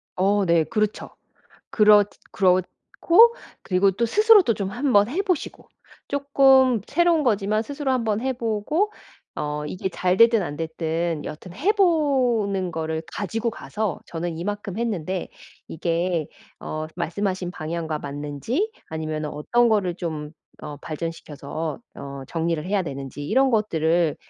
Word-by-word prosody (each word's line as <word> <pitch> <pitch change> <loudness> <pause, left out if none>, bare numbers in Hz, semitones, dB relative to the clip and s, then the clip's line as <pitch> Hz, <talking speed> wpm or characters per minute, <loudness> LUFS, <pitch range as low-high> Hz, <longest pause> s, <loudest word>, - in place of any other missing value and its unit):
어, 200 +2 +2
네. 170 -2 +3
그렇죠. 215 +3 -2 0.6
그렇 210 -1 +6 0.3
그렇고 200 - +3 0.3
그리고 190 +1 +2
또 210 +5 0
스스로도 420 - +5
좀 200 -3 -3
한번 240 -3 +3
해 340 +9 0
보시고 365 -6 -3 0.4
쪼끔 270 -4 +4
새로운 345 -2 +3
거지만 215 -3 +1
스스로 280 +2 -3
한 255 -2 +1
번 215 -1 0
해 265 +1 -1
보고 240 - -1 0.4
어, 150 0 -3
이게 185 +4 -3
잘 180 0 0
됐든 230 0 +6
안 150 -5 -4
됐든 160 0 -2
여하튼 165 +4 -8
해 320 - +2
보는 255 - +2
거를 160 0 -3
가지고 225 +4 -2
가서 210 -4 -4
저는 165 0 -4
이만큼 205 +2 -4
했는데, 190 -6 -2 0.4
이게 170 0 -1 0.3
어, 155 0 -4
말씀하신 185 0 -2
방향과 160 -2 -4
맞는지 145 - -3 0.2
아니면은 155 -1 -3
어떤 235 +12 +2
거를 200 -6 +1
좀 155 -4 -5 0.3
어, 150 -1 -7
발전시켜서 155 0 -5 0.2
어, 140 0 -8
정리를 165 -2 -1
해야 195 +1 +1
되는지 140 -2 -6
이런 265 - +3
것들을 170 -7 +1
190 Hz, 280 characters per minute, -23 LUFS, 160-235 Hz, 0.6 s, 그렇